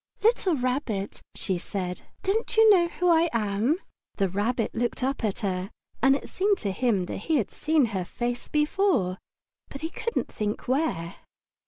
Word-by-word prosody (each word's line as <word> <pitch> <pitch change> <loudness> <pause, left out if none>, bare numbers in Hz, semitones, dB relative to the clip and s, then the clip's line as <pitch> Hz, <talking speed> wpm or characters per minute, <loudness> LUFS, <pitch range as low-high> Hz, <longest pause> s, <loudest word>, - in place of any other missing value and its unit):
"Little 420 -6 +3
Rabbit," 250 -6 -2
she 185 -3 -1
said, 180 -1 -4 0.2
"don't 440 +4 0
you 445 0 +8
know 350 -4 +5
who 360 +1 -1
I 335 +1 +4
am?" 220 - +1 0.4
The 195 -2 +1
Rabbit 220 +5 0
looked 240 +2 -1
up 270 -1 -1
at 210 0 -1
her, 190 -2 -2 0.3
and 270 +2 +6
it - - -5
seemed 400 +1 +1
to 200 - -2
him 205 -3 +1
that - - -5
he 315 +11 0
had 230 -9 0
seen 305 -3 +2
her 190 -2 0
face 240 +6 -3
before, 300 - +1 0.5
but 275 - -8
he 320 +1 -3
couldn't 465 - -3
think 210 0 -3
where. 255 - 0
245 Hz, 170 wpm, -27 LUFS, 200-320 Hz, 0.5 s, you